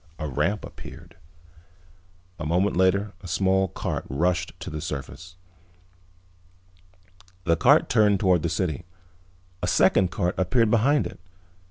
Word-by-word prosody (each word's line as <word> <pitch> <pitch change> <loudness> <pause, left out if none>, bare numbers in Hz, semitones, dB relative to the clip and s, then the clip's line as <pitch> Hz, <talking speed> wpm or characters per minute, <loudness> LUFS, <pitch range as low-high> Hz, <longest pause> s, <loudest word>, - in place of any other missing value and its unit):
A 75 - -4
ramp 75 +10 -1
appeared. - - -12 1.2
A 75 - -4
moment 90 +5 +1
later 95 +3 +2
a 95 - -9
small 95 +3 +1
cart - - -4
rushed 90 +5 -1
to - - -6
the 75 0 -5
surface. 85 +6 -7 2.1
The 85 -1 +2
cart - - +4
turned 105 -2 +3
toward 90 -4 +3
the 85 - -1
city. 85 -1 -2 0.8
A - - -1
second 95 - +3
cart 90 -1 -1
appeared 110 +4 +2
behind 135 +6 +3
it. - - -8
90 Hz, 130 wpm, -25 LUFS, 85-100 Hz, 2.1 s, cart